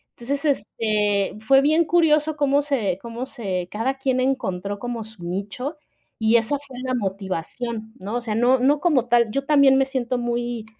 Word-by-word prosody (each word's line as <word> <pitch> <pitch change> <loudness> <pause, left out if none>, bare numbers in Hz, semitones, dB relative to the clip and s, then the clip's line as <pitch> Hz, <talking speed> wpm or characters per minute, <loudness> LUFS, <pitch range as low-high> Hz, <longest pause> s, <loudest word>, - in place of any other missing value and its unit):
Entonces, 275 +5 -3
este, 210 -6 0
fue 270 +3 +6
bien 310 +4 +3
curioso 310 -2 +3
cómo 285 0 +3
se 230 -11 -1
cómo 235 +2 -5
se 195 -9 -4
cada 255 +6 -1
quien 260 -1 0
encontró 205 -7 -2
como 240 -1 -4
su 215 -4 -15
nicho, 205 - -4 0.4
y 225 +1 +4
esa 235 +6 0
fue 265 -3 -11
la 255 - -1
motivación, 210 +2 -4
¿no? 205 +5 -5
O 245 - -1
sea, 220 -3 -3
no 245 +2 +3
no 280 +3 +3
como 290 -9 +2
tal 235 -2 +4
yo 275 +4 -1
también 280 -2 +5
me 270 - +3
siento 255 -2 -2
muy, 240 -1 -2
240 Hz, 180 wpm, -23 LUFS, 215-275 Hz, 0.4 s, fue